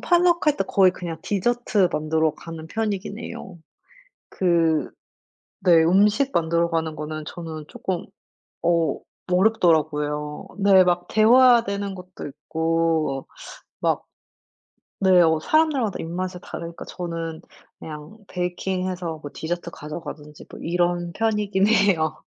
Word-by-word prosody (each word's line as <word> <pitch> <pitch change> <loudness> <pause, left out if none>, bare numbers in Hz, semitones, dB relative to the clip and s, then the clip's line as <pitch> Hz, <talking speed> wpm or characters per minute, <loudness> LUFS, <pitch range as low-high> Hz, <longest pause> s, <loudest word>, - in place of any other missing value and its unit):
portluck 350 -1 +3
할 295 - +2
때 195 - 0
거의 190 -2 +4
그냥 170 -3 -6
디저트 210 -2 +1
만들러 155 0 +1
가는 165 -1 -9
편이긴 210 0 -3
해요. 190 -6 -8 0.7
그 165 -4 +1 0.7
네 165 -3 +5
음식 210 +10 +3
만들어 170 0 +1
가는 160 -2 -1
거는 155 +1 -5
저는 160 -2 -7
쪼끔 185 -2 -4 0.6
어 170 -3 +2 0.3
어렵더라고요. 155 -7 +1 0.2
네 190 -2 +7
막 175 0 +1
데워야 240 +2 +6
되는 200 -1 -3
것도 180 -3 -9
있고 160 -1 -1 0.5
막 - - 0 1.0
네 185 -2 +5
어 160 -1 +3
사람들마다 280 - +1
입맛이 180 +2 -4
다르니까 170 0 -7
저는 165 -2 -5 0.4
그냥 155 +6 -9
베이킹해서 180 -1 -3
뭐 145 - -7
디저트 170 +1 -4
가져가든지 150 -1 -8
뭐 - - -10
이런 175 0 0
편이긴 210 -2 +1
해요. 200 -8 +2
175 Hz, 270 characters per minute, -23 LUFS, 160-200 Hz, 1.0 s, 네